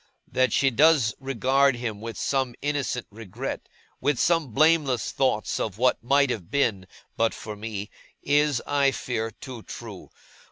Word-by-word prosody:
That 130 0 +1
she 135 0 +3
does 145 -4 +4
regard 135 +1 +2
him 115 -4 -5
with 115 0 -6
some 130 -3 -1
innocent 145 -4 -1
regret, 115 +4 -6 0.3
with 145 -2 +1
some 165 -3 +2
blameless 150 -2 +2
thoughts 130 -6 0
of 105 -3 -3
what 125 +2 +2
might 140 +1 +3
have 95 -8 -5
been, 105 -10 0 0.3
but 115 0 +1
for 105 -1 -7
me, 105 -1 -6 0.3
is, 145 -2 +2
I 140 -1 +3
fear, 115 -4 -3
too 120 +1 -10
true. 110 -4 -9
125 Hz, 150 wpm, -25 LUFS, 110-140 Hz, 0.3 s, does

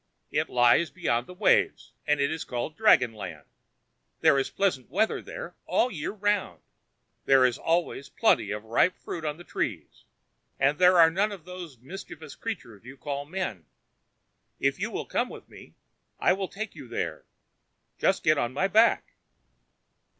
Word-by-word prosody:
It - - 0
lies 120 +7 +4
beyond 125 -10 -1
the - - -10
waves, 200 +2 +2 0.2
and 150 -1 +2
is 150 +3 0
called 125 +5 -4
dragon 125 - +4
land. 105 -3 -8 0.8
There 140 - +5
is 135 - -1
pleasant 180 -11 -1
weather 210 +10 +1
there - - -8
all 250 - +2
the 220 - -9
year 145 - -3
round; 205 -1 -1 0.6
there 135 -1 +6
is 125 0 +1
always 165 -4 -1
plenty 220 - +2
of 105 +1 -4
ripe 115 +11 +2
fruit 165 - -7
on 150 -1 -3
the 175 - -11
trees, - - -4 0.5
and 140 +2 +2
there 180 0 +6
are 165 -1 +7
none 200 +5 +1
of 190 -5 -9
those 180 -6 -9
mischievous 155 - -10
creatures 145 - -7 0.2
called 140 +1 -5
men. 160 - -4 0.9
If - - +1
you - - -1
will - - -4
come - - -1
with - - -11
me, - - -15 0.4
I - - +4
will 190 0 -3
take 220 +2 -6
you - - -11
there. - - -4 0.7
Just 190 - +2
get 155 -2 +4
on 120 +1 -1
my 185 +8 +1
back." 220 +4 +3
160 Hz, 165 wpm, -27 LUFS, 130-190 Hz, 0.9 s, are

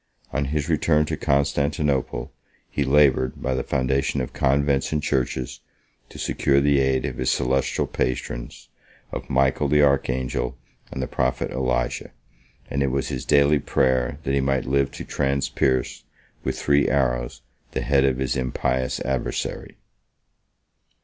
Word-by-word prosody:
On 70 +3 0
his 75 +1 -2
return 75 -1 +2
to - - -2
Constantinople, 70 0 0 0.4
he 70 - -1
labored, 65 -2 +3
by 65 - -1
the 65 - 0
foundation 65 +2 0
of 65 - -4
convents 70 0 +1
and 75 -1 -1
churches, 65 -2 -1 0.5
to - - -12
secure 70 0 +1
the 70 0 +3
aid 65 -1 +1
of - - -4
his - - 0
celestial 65 +1 +1
patrons, - - -4 0.4
of - - -6
Michael 65 +2 +2
the 75 +1 +4
archangel 65 -2 0 0.3
and 65 - -3
the - - -3
prophet 65 -1 -1
Elijah; 65 -2 -1 0.6
and 70 - -2
it 70 - +2
was 65 +1 -1
his 65 +3 -4
daily 70 0 +4
prayer 65 0 +1
that 70 - -1
he 70 - +2
might 65 -1 0
live 70 +1 +1
to - - -8
transpierce, 70 -2 0 0.4
with 65 0 -2
three 70 +2 +2
arrows, 65 -1 0 0.3
the - - -1
head 70 -1 +3
of 65 -2 +2
his 65 -1 -1
impious 65 0 -1
adversary. 65 -2 -3
65 Hz, 145 wpm, -23 LUFS, 65-70 Hz, 0.6 s, the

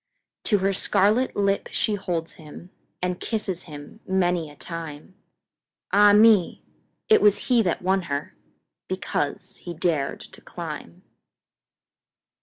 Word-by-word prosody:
To 210 - +3
her 195 0 +1
scarlet 210 +6 +2
lip 200 -1 0
she 215 - 0
holds 175 -5 -3
him, 160 +3 -13 0.3
And 180 0 -1
kisses 205 -6 -2
him 145 +5 -11
many 180 -4 +1
a 145 - -14
time—Ah, 165 +5 -2
me! 210 -3 +5 0.4
it 435 - +5
was 210 +4 +3
he 240 -2 +5
that 180 -3 -1
won 190 0 +1 0.8
herBecause 185 -1 -3
he 175 -1 -7
dared 155 -4 -1
to - - -13
climb! - - -8
185 Hz, 115 wpm, -24 LUFS, 170-205 Hz, 0.8 s, me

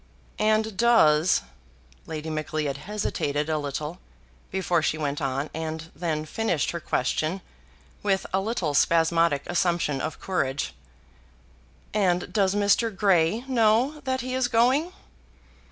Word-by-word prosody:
"And 215 0 +2
does 180 -9 +4 0.3
" 60 -1 -30
Lady 160 0 -5
Macleod 155 -2 -2
hesitated 150 -5 -2
a 155 - +1
little 150 +4 -4 0.5
before 180 -3 0
she 155 - 0
went 145 -1 -2
on, 135 +2 -2
and 160 0 -5
then 155 -3 -2
finished 175 -3 -1
her 170 - -4
question 155 +5 -1 0.6
with 195 -2 0
a 190 - +3
little 190 -8 -1
spasmodic 165 -1 +3
assumption 170 -5 0
of 155 - -4
courage. 140 -8 -2 1.2
"And 180 -4 +1
does 200 -2 +2
Mr. 205 +3 +3
Grey 190 -1 +2
know 250 +4 +2
that 260 0 -1
he 255 +1 -4
is 260 -1 +1
going?" 255 +8 +2
170 Hz, 125 wpm, -26 LUFS, 155-215 Hz, 1.2 s, does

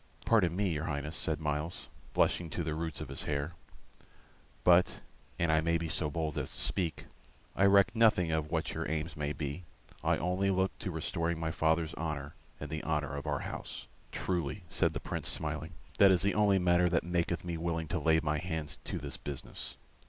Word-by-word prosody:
"Pardon 95 -7 +4
me, 100 0 +1
your 80 -1 -1
Highness," 75 0 -3
said 80 -1 -1
Myles, 75 +2 -2 0.3
blushing 85 -2 +3
to 85 - -2
the 80 -1 -2
roots 80 -1 -3
of - - -6
his 70 - -5
hair; 75 +2 -1 1.1
"but, 90 0 +5 0.4
an 85 -1 +2
I 80 0 +4
may 85 +1 +2
be 80 0 -3
so 75 -1 0
bold 80 -1 -2
as 65 - -3
to - - -6
speak, 85 -5 0 0.5
I 100 - +4
reck 100 +3 +5
nothing 105 -7 +4
of 80 -1 0
what 80 -1 -1
your - - -3
aims 80 +1 -2
may 75 -1 -2
be; 75 +4 -4 0.4
I - - +3
only 90 +3 +1
look 95 0 +1
to - - -3
restoring 85 0 -1
my 80 -1 -1
father's 80 0 +1
honor 75 -2 -4 0.3
and 75 -1 -6
the 80 0 -2
honor 75 -2 -1
of 70 - -5
our - - 0
house." - - -6 0.2
"Truly," 90 +1 -2
said 90 -4 +2
the 70 - -2
Prince, - - -3
smiling, 80 +3 -2 0.3
"that 100 - +9
is 95 -1 +4
the 100 - +2
only 105 -2 +4
matter 90 -1 +4
that 85 -1 +2
maketh 85 0 -1
me 85 -1 -2
willing 80 -1 -2
to 90 - 0
lay 80 +1 +4
my 75 -1 0
hands 80 -4 -3
to - - -3
this 70 0 -4
business. 70 -3 -6
80 Hz, 200 wpm, -32 LUFS, 75-90 Hz, 1.1 s, that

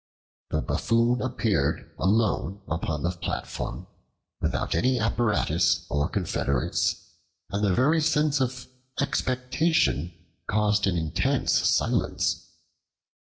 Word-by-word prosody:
The - - -1
Buffoon 120 +2 +1
appeared 115 - -1
alone 100 -1 +1
upon 80 -3 -2
the 85 - +1
platform, 85 -1 -5 0.6
without - - -1
any 130 0 +2
apparatus 110 0 +1
or 75 +3 +1
confederates, 70 -9 -1 0.5
and 100 +1 -1
the 95 -3 +3
very 155 +6 +3
sense 150 -2 +2
of 125 0 -2 0.3
expectation 125 - +1 0.4
caused 105 -1 +2
an 90 -3 +1
intense 80 -1 0
silence. - - +1
110 Hz, 100 wpm, -26 LUFS, 90-125 Hz, 0.6 s, the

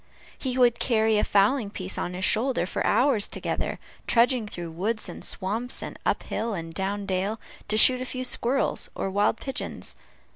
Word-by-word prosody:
He 260 -2 -3
would 240 -2 +4
carry 220 -3 +2
a - - +1
fowling 210 +3 +2
piece 190 -2 -2
on 180 - -3
his 185 +1 -1
shoulder, 240 -3 +1
for - - -3
hours 250 -6 +3
together, - - -3 0.3
trudging 240 -1 +3
through 175 -4 -6
woods 210 +7 -1
and - - -9
swamps, 220 +6 -1
and - - -7
up - - +1
hill 225 -1 -3
and 165 -2 -6
down 200 +3 -3
dale, 195 +3 -1 0.3
to 215 0 +1
shoot 255 +3 +7
a - - -3
few 255 0 -4
squirrels 255 +1 +1
or 195 - -3
wild 205 +3 +2
pigeons. 270 - -5
215 Hz, 180 wpm, -26 LUFS, 195-245 Hz, 0.3 s, shoot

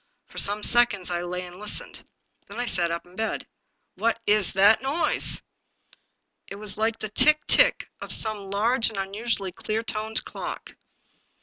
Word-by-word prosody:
For - - -7
some 205 +1 0
seconds 230 -7 +4
I 175 0 -2
lay 180 +1 -5
and 180 0 -12
listened. 210 0 -3 0.4
Then 205 +4 -9
I 245 - -1
sat 175 -7 0
up 170 0 -4
in 175 +1 -19
bed. 220 +1 -3 0.5
"What 230 0 -1
w 210 +1 +4
that 200 +3 +5
noise?" 280 +6 +2 1.0
It - - -8
was 210 0 -3
like 220 +1 -1
the 215 - -6
tick, 295 +8 +4
tick - - +4
of - - -6
some 210 -3 -1
large 225 +5 +1
and 220 - -10
unusually 200 0 -3
clear 215 +5 -4
toned 220 0 -3
clock. - - -7
210 Hz, 165 wpm, -25 LUFS, 195-225 Hz, 1.0 s, that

